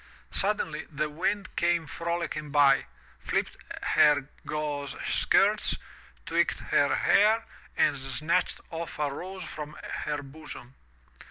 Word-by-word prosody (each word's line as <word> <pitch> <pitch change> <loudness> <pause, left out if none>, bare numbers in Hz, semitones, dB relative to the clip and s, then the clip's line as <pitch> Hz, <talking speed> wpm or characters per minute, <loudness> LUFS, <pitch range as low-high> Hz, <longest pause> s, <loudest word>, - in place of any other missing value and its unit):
Suddenly 480 - -1
the 150 0 -2
wind 190 +5 -1
came 170 -1 +2
frolicking 170 -1 -3
by, 140 -2 +5 0.3
flipped - - -1 0.3
her 145 -2 +5 0.2
gauze 145 -2 -3
skirts, - - +3 0.5
tweaked - - +1
her - - +2
hair, 220 +2 +4 0.3
and 150 - +4
snatched 135 +4 -1
off 165 0 -5
a 145 -2 0
rose 185 +5 -6
from 150 0 -7 0.3
her 145 -1 -2
bosom. 140 -3 -10
150 Hz, 110 wpm, -28 LUFS, 145-170 Hz, 0.5 s, by